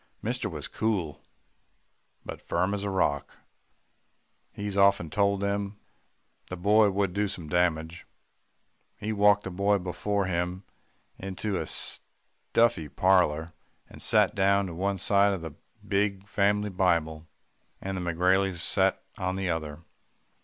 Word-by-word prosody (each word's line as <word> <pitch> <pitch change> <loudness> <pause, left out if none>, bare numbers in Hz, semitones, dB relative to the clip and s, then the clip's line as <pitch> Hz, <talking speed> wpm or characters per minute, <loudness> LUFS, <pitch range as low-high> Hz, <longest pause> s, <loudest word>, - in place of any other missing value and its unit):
"Mister 120 0 -2
was 75 -5 -6
cool 95 -9 -2 1.0
but - - -7
firm 90 +4 -1
as 100 -1 -3
a 100 - -2
rock 75 -7 -1 1.1
he's 100 -1 -5
often 100 -5 +3
told 100 -1 +1
them 100 0 -2 0.7
the 90 - -6
boy 105 +3 +4
would 100 -2 -1
do 105 +1 0
some 90 -5 -6
damage. 85 0 -1 0.9
He 110 +1 -3
walked 105 0 +4
the 95 - -5
boy 100 +3 +2
before 100 +2 -2
him 90 +1 -2 0.6
into 95 +2 -4
the 95 - -2
stuffy 115 -10 -1
parlour, 85 -3 +2 0.3
and - - -13
sat - - +3
down 100 0 +2
on 85 - -9
one 100 +2 -1
side 100 +2 +3
of 95 - -4
the 80 -2 -7 0.3
big 100 0 0
family 105 0 +1
Bible, 85 -4 0 0.5
and 95 0 -4
the 95 - -3
McGraileys 90 +2 +1
sat 85 - +2 0.2
on 95 0 -1
the 95 -2 -1
other. 80 -1 -5
95 Hz, 135 wpm, -27 LUFS, 85-100 Hz, 1.1 s, boy